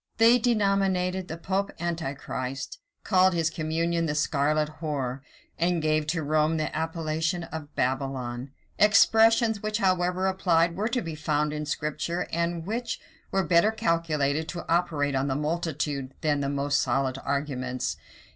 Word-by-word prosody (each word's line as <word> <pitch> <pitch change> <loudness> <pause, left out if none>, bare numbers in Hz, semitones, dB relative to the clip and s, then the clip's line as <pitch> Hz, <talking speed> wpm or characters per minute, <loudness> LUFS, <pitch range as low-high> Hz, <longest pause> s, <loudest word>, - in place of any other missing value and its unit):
They 230 +2 +6
denominated 195 -5 +1
the 160 - -5
pope 195 +3 -1
Antichrist, 135 -5 -4 0.2
called 185 -1 +4
his 165 -1 +1
communion 165 +1 -1
the 150 - -1
scarlet 150 +1 0
whore, 140 -5 -2 0.4
and 175 +1 +2
gave 155 -1 +1
to 160 0 -1
Rome 155 +2 +2
the 155 - -2
appellation 160 +1 -1
of 160 -2 -8
Babylon; 130 -1 -2 0.3
expressions 220 +1 +5
which, 215 0 -1
however 185 -2 +1
applied, 175 -3 +2
were 210 +4 0
to 245 0 -1
be 165 - -5
found 150 -1 0
in 150 0 -4
Scripture, 155 +4 -2
and 170 0 -1
which 230 +4 -3 0.3
were 195 0 +1
better 170 +4 +4
calculated 160 -7 0
to 175 - -6
operate 160 -4 +1
on 135 +1 0
the 135 - 0
multitude 150 -3 -2
than 150 -2 +1
the 140 -1 -1
most 140 0 +1
solid 130 +1 0
arguments. 135 -3 -2
160 Hz, 145 wpm, -27 LUFS, 145-180 Hz, 0.4 s, They